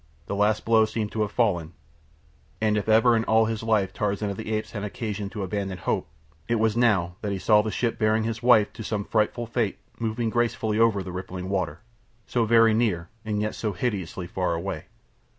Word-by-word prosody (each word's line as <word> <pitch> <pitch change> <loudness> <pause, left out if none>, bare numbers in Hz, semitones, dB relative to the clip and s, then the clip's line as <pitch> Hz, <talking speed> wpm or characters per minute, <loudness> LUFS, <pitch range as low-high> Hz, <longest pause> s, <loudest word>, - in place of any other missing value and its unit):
The - - -4
last 105 +1 +1
blow 110 -1 +5
seemed 110 -1 -3
to 110 - -2
have 105 -1 0
fallen, 90 -8 0 0.9
and 110 -1 +2
if 105 +1 -1
ever 115 +2 +5
in 110 - +1
all 110 0 +4
his 110 -1 -2
life 105 -4 +1
Tarzan 105 0 -1
of 100 - -6
the 110 0 -5
Apes 110 0 -2
had 105 - -5
had 105 - -2
occasion 105 -4 -4
to 105 -1 -5
abandon 95 -1 -3
hope - - -1 0.4
it 120 - +1
was 110 -1 +1
now 95 -8 +2
that 105 - -2
he 100 - -1
saw 105 +3 +4
the 110 - -3
ship 115 +2 -1
bearing 110 0 +2
his 115 0 -3
wife 120 -4 +5
to 110 - -7
some 105 -2 -2
frightful 110 +2 0
fate 115 -3 -1 0.2
moving 115 0 -1
gracefully 115 -2 0
over 110 -4 +3
the 90 - -7
rippling 90 0 -6
water, 90 -5 -2 0.4
so 120 +2 0
very 115 0 +5
near 100 -7 0
and 105 -1 -1
yet 105 - -2
so 105 -3 -3
hideously 95 -3 -3
far 90 -1 -1
away. 85 -2 -4
105 Hz, 210 wpm, -25 LUFS, 100-115 Hz, 0.9 s, blow